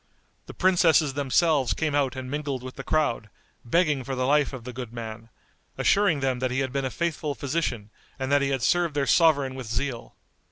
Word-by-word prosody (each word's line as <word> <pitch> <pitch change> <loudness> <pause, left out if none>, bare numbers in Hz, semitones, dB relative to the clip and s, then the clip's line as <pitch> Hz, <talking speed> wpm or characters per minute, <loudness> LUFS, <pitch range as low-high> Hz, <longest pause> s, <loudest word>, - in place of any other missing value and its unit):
The - - -10
princesses 170 -6 +3
themselves 140 0 +2
came 155 -2 -1
out 140 -2 +1
and 130 0 -5
mingled 140 -2 -3
with 130 0 -8
the 135 - -7
crowd, 140 -9 0 0.3
begging 150 +1 +1
for 135 +1 -4
the 130 0 -1
life 145 +1 +2
of 130 -4 -8
the 125 +1 -7
good 125 -2 -7
man, 115 -1 -8 0.5
assuring 195 -8 +2
them 130 -2 0
that 130 0 0
he 130 +2 -1
had 130 -1 -2
been 135 0 -2
a - - -1
faithful 155 -2 -2
physician 130 -6 -3 0.3
and 135 0 -3
that 145 0 +4
he 140 - 0
had 135 -3 -1
served 175 -1 +1
their 140 -1 +1
sovereign 140 -3 +3
with 130 -3 -7
zeal. 120 +1 -4
135 Hz, 205 wpm, -26 LUFS, 125-150 Hz, 0.5 s, that